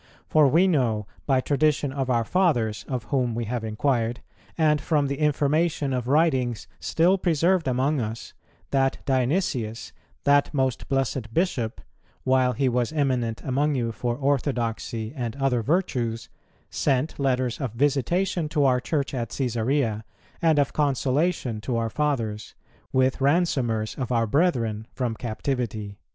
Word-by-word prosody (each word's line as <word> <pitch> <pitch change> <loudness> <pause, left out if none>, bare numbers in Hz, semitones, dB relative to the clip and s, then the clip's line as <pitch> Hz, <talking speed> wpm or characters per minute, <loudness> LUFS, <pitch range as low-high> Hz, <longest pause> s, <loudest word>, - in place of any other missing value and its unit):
For 155 -2 +5
we 170 +8 +4
know, 120 - +1 0.2
by 135 -2 +3
tradition 145 0 +1
of 135 -2 -2
our 120 -2 +2
fathers 120 - +1
of 125 -4 -3
whom 125 -4 0
we 120 0 -2
have 120 +1 -3
inquired, 115 +1 0 0.4
and 150 -3 +3
from 150 -1 +1
the 140 +1 -3
information 150 0 +1
of 125 -2 -2
writings 130 -6 +2
still 180 +4 +2
preserved 170 -1 +2
among 130 +3 +1
us, 110 +1 -5 0.4
that 135 -1 +2
Dionysius, 130 - -1 0.3
that 145 0 +3
most 130 -3 -1
blessed 135 -4 -1
Bishop, 130 -11 -1 0.4
while 130 -1 +3
he 135 +4 0
was 125 0 0
eminent 130 -7 -1
among 145 +3 +1
you 120 -3 -1
for 120 +1 -2
orthodoxy 120 -4 -1
and 120 -4 -3
other 135 -3 +1
virtues, 120 - -1 0.4
sent 140 +2 0
letters 130 -1 0
of 130 -5 -3
visitation 145 +6 0
to 150 -2 +2
our 130 -2 +3
Church 140 +1 -2
at 120 -4 -2
Cæsarea, 120 -2 0 0.4
and 160 -2 +3
of 145 -1 +2
consolation 140 -3 0
to 120 +1 -2
our 115 -1 -1
fathers, 115 -8 -2 0.4
with 130 +1 +2
ransomers 135 -7 +1
of 125 -2 -3
our 115 -2 +2
brethren 115 -6 0
from 125 -3 -1
captivity." 110 -3 -4
130 Hz, 140 wpm, -25 LUFS, 115-145 Hz, 0.4 s, For